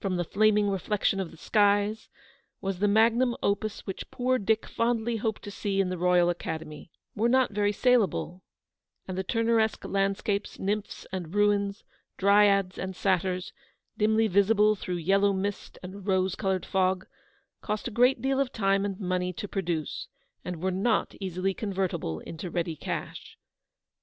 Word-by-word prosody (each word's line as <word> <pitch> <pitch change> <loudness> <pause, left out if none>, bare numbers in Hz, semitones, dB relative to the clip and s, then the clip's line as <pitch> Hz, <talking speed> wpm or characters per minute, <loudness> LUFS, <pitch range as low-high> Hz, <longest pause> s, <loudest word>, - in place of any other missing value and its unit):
195 180 -4 -1
the - - -28
flaming 210 0 +4
reflection 195 +1 0
of 190 -3 -3
the 165 - -15
skies, 205 +3 +2 0.5
was 195 -2 -3
the 205 - +3
magnum 230 +4 +3
opus 205 +1 -1
which 195 - -6
poor 255 +1 0
Dick 220 +2 +1
fondly 230 0 0
hoped 220 -1 -3
to 205 - -7
see 200 -1 -2
in 190 -2 +2
the 185 - -3
Roy 180 0 +4
al 175 0 +4
Academy 160 -4 -6
— - - -53
were 225 +3 +2
not 260 -1 +3
very 205 0 +1
saleable; 205 - +1 0.7
and 185 - -4
the 190 - -2
Turneresque 225 +1 +1
landscapes, 200 +1 -1
nymphs 205 +2 -3
and 180 -1 -5
rains, 205 -1 +1 0.3
dryads 200 -1 +4
and 190 0 -4
satyrs, 185 -1 0 0.4
dimly 220 +1 +3
visible 210 +2 +4
through 180 -2 -4
yellow 195 +4 +2
mist 200 +1 -4
and 190 +2 -9
rose 190 -1 +2
coloured 190 -2 -1
fog, 185 -1 +1 0.6
cost 210 +1 -3
a - - -5
great 245 +2 +3
deal 270 0 +1
of 275 -2 0
time 195 -2 +1
and 195 -2 -4
money 180 -1 -1
to 205 +4 -6
produce, 170 -6 -3 0.4
and 180 -2 -6
were 190 - +1
not 195 +5 0
easily 190 0 -1
convertible 185 - -3
into 165 +2 -7
ready 165 -1 -2
cash. - - -6
200 Hz, 160 wpm, -28 LUFS, 185-215 Hz, 0.7 s, flaming